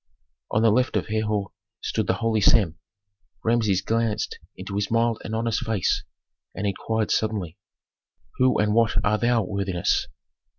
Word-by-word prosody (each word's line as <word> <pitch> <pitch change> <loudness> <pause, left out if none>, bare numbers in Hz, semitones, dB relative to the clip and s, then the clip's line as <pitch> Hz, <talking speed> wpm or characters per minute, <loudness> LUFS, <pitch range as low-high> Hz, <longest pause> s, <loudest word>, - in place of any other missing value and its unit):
On 110 - +1
the 115 - +5
left 125 +4 +1
of - - -3
Herhor 105 -2 -1 0.3
stood - - -2
the - - +2
holy 115 -2 0
Sem. 85 -6 +4 0.6
Rameses 110 -5 +2
glanced 115 -1 -1 0.2
into - - -7
his 100 +1 -1
mild 115 0 +1
and 110 - -4
honest 115 -1 0
face 110 -6 0 0.5
and 100 - -3
inquired 110 +2 -1
suddenly, 105 -5 -1 0.8
"Who 130 0 +4
and 105 0 +2
what 115 -2 +3
art 105 +1 +1
thou, 120 -2 +3
worthiness?" 95 -2 0
110 Hz, 145 wpm, -24 LUFS, 100-115 Hz, 0.8 s, the